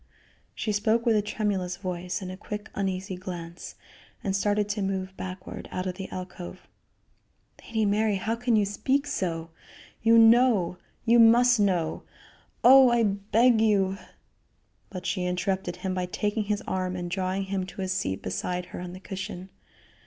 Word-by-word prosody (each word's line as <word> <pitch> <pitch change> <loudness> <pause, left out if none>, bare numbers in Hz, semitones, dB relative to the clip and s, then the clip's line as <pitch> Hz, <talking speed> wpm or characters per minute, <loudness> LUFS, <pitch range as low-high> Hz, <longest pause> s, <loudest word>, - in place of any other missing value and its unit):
She 215 - -2
spoke 220 +3 +1
with 230 -2 +4
a 210 - +3
tremulous 200 -4 -2
voice 180 0 -4
and 185 - -5
a - - -6
quick, 210 +2 -7
uneasy 190 -1 -2
glance, 175 -2 -8 0.5
and 195 -1 0
started 205 +1 +1
to 205 0 -2
move 190 -1 -2
backward 185 0 -7
out 185 - -3
of 185 - -2
the 190 +1 -7
alcove. 185 0 -8 1.0
"Lady 220 -1 0
Mary, 210 +1 +2
how 220 +4 -1
can 240 0 +1
you 210 -2 +3
speak 265 +8 0
so? 165 - -3 0.5
You 230 +1 +5
know 225 -6 +5 0.3
you 235 0 +5
must 240 +1 +6
know 180 -6 +1 0.6
oh! 265 +1 +9
I 240 -1 +3
beg 215 +3 +3
you 195 -3 +2 0.5
" - - -42
But 185 -3 -7
she 185 -1 -1
interrupted 180 0 -1
him 190 -1 -3
by 180 -1 -2
taking 210 +3 -1
his 210 +2 -1
arm 185 -1 -2
and 175 -1 -4
drawing 185 +2 -1
him 190 -1 -3
to 190 +1 -6
a - - -2
seat 185 - -2
beside 180 - -3
her - - -5
on 180 0 -6
the 185 - -9
cushion. 190 -1 -7
195 Hz, 165 wpm, -27 LUFS, 185-215 Hz, 1.0 s, oh